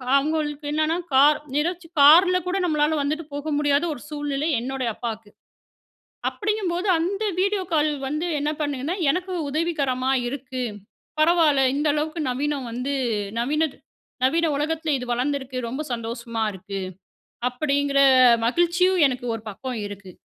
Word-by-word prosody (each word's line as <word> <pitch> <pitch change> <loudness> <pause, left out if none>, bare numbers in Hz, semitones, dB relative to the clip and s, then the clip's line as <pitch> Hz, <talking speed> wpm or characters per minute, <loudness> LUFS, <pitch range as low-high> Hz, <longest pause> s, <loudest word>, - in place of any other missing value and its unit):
அவங்களுக்கு 295 0 0
என்னன்னா, 310 +2 +1 0.2
கார் 285 +3 +6 0.2
நிரச்சி 335 +3 -1
கார்ல 355 +6 +7
கூட 365 +2 0
நம்மளால 305 -1 +1
வந்துட்டு 305 +3 -2
போக 290 +2 -4
முடியாத 290 +1 +2
ஒரு 245 - -10
சூழ்நிலை 290 0 -2
என்னுடைய 260 -1 -2
அப்பாக்கு. 225 -3 -6 1.0
அப்டிங்கும் 420 -3 -2
போது 360 +4 -2
அந்த 390 +6 -1 0.2
வீடியோ 395 0 +1
கால் 305 -1 +3 0.2
வந்து 305 +5 -2
என்ன 295 +1 0
பண்ணுதுனா 290 +2 -2 0.2
எனக்கு 365 +4 -2 0.2
உதவிகரமா 275 -5 0 0.2
இருக்கு. 255 -1 -5 0.6
பரவாயில்ல 310 -4 +4
இந்த 295 +2 0
அளவுக்கு 310 +2 -2
நவீனம் 280 0 -2
வந்து 250 +4 -3 0.5
நவீன 300 +5 +1 0.5
நவீன 325 +5 +2
உலகத்துல 315 +2 -1
இது 250 - -6
வளர்ந்து 265 +4 0
இருக்கு. 265 -1 -8
ரொம்ப 265 +6 -4
சந்தோஷமா 230 -1 -4
இருக்கு. 195 +1 -7 0.7
அப்டிங்குற 280 +1 +1 0.5
மகிழ்ச்சியும் 345 +6 +2
எனக்கு 250 -2 -4
ஒரு 225 - -7
பக்கம் 245 +3 -5
இருக்கு. 200 -2 -10
295 Hz, 135 wpm, -23 LUFS, 260-325 Hz, 1.0 s, கார்ல